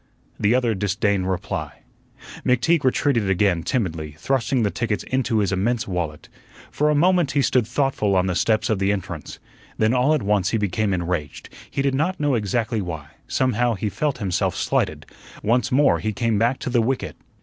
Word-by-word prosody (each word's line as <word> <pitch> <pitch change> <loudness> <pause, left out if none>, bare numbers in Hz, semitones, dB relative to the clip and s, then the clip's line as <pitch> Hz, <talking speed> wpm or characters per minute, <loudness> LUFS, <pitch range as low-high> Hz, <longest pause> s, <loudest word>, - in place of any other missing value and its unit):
The 105 +4 +3
other 120 -3 +2
disdained 100 -1 0
reply. 95 +1 -4 0.6
McTeague 140 +6 +2
retreated 125 -5 +1
again 95 -2 +2
timidly, 80 - -2
thrusting 130 - 0
the 105 - +1
tickets 115 -3 -2
into 130 -3 0
his 100 -3 +1
immense 110 +5 0
wallet. 85 -5 -4 0.4
For 150 +1 +1
a 150 - +2
moment 175 -1 +3
he 140 -1 +2
stood 125 -4 +2
thoughtful 125 -6 0
on 90 0 +3
the 95 - 0
steps 110 +4 +1
of 105 - 0
the 100 0 +2
entrance. 100 -4 -5 0.4
Then 110 +2 +2
all 130 +5 +3
at 150 - -2
once 100 -2 +1
he 115 - 0
became 105 0 0
enraged, 85 -5 -3 0.2
he 135 - -2
did 140 -1 +1
not 160 +7 0
know 145 -2 +1
exactly 110 0 0
why; 80 -6 -6 0.2
somehow 120 -2 +1
he 105 +2 -2
felt 145 +6 -1
himself 95 -6 -1
slighted. - - -1 0.4
Once 120 +4 +1
more 140 +3 +4
he 110 -1 -2
came 115 0 0
back 120 +4 +2
to 125 - -3
the 120 -1 +3
wicket. 130 +3 -2
110 Hz, 185 wpm, -22 LUFS, 95-130 Hz, 0.6 s, more